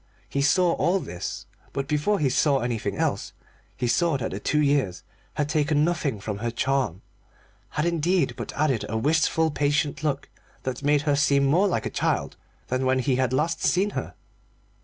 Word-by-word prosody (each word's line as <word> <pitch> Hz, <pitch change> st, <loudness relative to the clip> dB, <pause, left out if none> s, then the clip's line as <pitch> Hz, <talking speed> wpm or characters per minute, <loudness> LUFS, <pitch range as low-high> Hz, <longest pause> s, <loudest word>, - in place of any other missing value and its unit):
He 140 Hz, -, -1 dB
saw 175 Hz, +5 st, +4 dB
all 185 Hz, +3 st, +1 dB
this, 90 Hz, -, -6 dB, 0.3 s
but 135 Hz, 0 st, -2 dB
before 150 Hz, +9 st, +1 dB
he 150 Hz, -, +1 dB
saw 140 Hz, +2 st, +3 dB
anything 120 Hz, -2 st, -2 dB
else -, -, -1 dB, 0.4 s
he 125 Hz, -, -1 dB
saw 155 Hz, +5 st, +2 dB
that 125 Hz, -, -3 dB
the 95 Hz, -, -4 dB
two 150 Hz, +8 st, 0 dB
years 140 Hz, -10 st, +1 dB, 0.3 s
had 150 Hz, -, 0 dB
taken 150 Hz, -1 st, +2 dB
nothing 150 Hz, -9 st, -1 dB
from 105 Hz, 0 st, -4 dB
her 120 Hz, +2 st, -1 dB
charm, 120 Hz, -6 st, -1 dB, 0.7 s
had 150 Hz, -, +2 dB
indeed 170 Hz, +2 st, +1 dB
but -, -, -6 dB
added 140 Hz, -6 st, +1 dB
a 110 Hz, -, -1 dB
wistful 160 Hz, +4 st, +2 dB
patient 145 Hz, 0 st, 0 dB
look 140 Hz, -3 st, -1 dB, 0.4 s
that 130 Hz, 0 st, -3 dB
made 145 Hz, 0 st, +2 dB
her 145 Hz, -2 st, +2 dB
seem 140 Hz, -1 st, +3 dB
more 175 Hz, +7 st, +3 dB
a -, -, -3 dB
child -, -, -1 dB, 0.3 s
than 130 Hz, +1 st, -1 dB
when 130 Hz, 0 st, +2 dB
he 130 Hz, 0 st, +1 dB
had 130 Hz, -2 st, +1 dB
last 160 Hz, +5 st, 0 dB
seen 195 Hz, +3 st, +2 dB
her. -, -, -5 dB
145 Hz, 180 wpm, -25 LUFS, 130-155 Hz, 0.7 s, saw